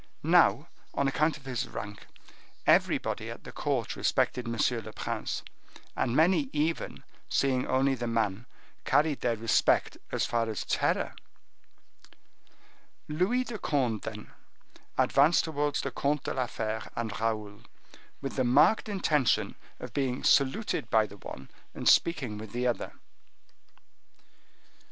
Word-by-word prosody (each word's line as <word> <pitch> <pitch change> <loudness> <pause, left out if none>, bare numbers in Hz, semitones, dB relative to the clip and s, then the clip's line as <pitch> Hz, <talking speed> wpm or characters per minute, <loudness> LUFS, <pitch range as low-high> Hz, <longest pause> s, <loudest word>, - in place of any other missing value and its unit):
Now, - - +4 0.3
on 140 - +1
account 155 +3 +1
of 140 - -19
his 125 -3 -2
rank, 105 0 -8 0.6
everybody - - +2
at - - -8
the - - -9
court - - -2
respected 125 -2 0
M. 115 0 -3 0.3
le 110 - -8
Prince, - - -3 0.5
and 120 - 0
many 160 -3 +3
even, 155 +2 -2 0.3
seeing 130 -2 +1
only 135 +1 +2
the 120 -2 -3
man, 115 -1 -1 0.4
carried 150 -2 +2
their 120 -2 +1
respect 115 0 +2
as - - 0
far 115 -1 0
as 110 - -3
terror. - - 0 1.9
Louis 185 +12 +1
de 230 -3 -6
Conde 125 - 0
then 105 -1 -7 0.7
advanced 145 +5 +4
towards 145 -2 -1
the - - -3
Comte 145 0 0
de - - -3
la 130 -2 -1
Fere 110 -1 -3
and 115 -2 -2
Raoul, 110 -2 -2 0.6
with 135 - -4
the 130 - +3
marked 130 - +4
intention 155 - +1 0.3
of - - -8
being 135 -2 -1
saluted 140 +11 +2
by 110 -1 +4
the 100 -1 -12
one, 65 -7 -10 0.2
and - - -6
of - - +5
speaking 130 -11 0
with 110 -1 -9
the 125 +1 -1
other. 120 -1 -1
130 Hz, 135 wpm, -29 LUFS, 115-150 Hz, 1.9 s, of